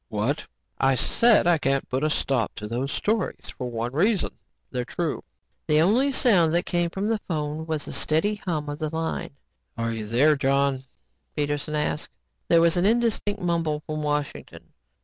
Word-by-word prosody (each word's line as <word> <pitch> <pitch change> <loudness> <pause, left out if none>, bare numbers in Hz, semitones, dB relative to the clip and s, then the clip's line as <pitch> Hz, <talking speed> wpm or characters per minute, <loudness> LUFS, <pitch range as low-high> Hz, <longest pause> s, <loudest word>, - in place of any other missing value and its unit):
What? 115 +7 -1 0.3
I 135 0 +3
said 230 - +4
I 170 -2 +4
can't 135 -1 0
put 130 +3 -2
a 155 - +2
stop 135 -6 0
to 105 - -6
the 120 +5 -2
stories 215 +10 -2
for 125 -2 -4
one 120 +1 -3
reason. 195 +7 +2 0.4
They're 125 -1 -2
true." 150 +5 -3 0.4
The 155 -1 +4
only 235 - +3
sound 185 -12 +3
that 175 - +2
came 175 -1 0
from 195 +4 -3
the 220 0 +1
phone 155 -1 -3
was 155 -2 -2
the - - -7
steady 160 +7 +1
hum 160 -7 -3
of 145 +1 -5
the 155 -1 -2
line. 160 -2 -3 0.4
"Are 115 0 -1
you 110 -2 -5
there, 140 +8 +4
John?" 135 -1 +1 0.5
Peterson 145 +1 -2
asked. 150 0 -1 0.4
There 165 -1 +5
was 170 +1 +3
an 175 - +2
indistinct 220 -3 +1
mumble 165 -3 0
from 155 -1 -4
Washington. 150 -1 -4
155 Hz, 175 wpm, -25 LUFS, 135-175 Hz, 0.5 s, There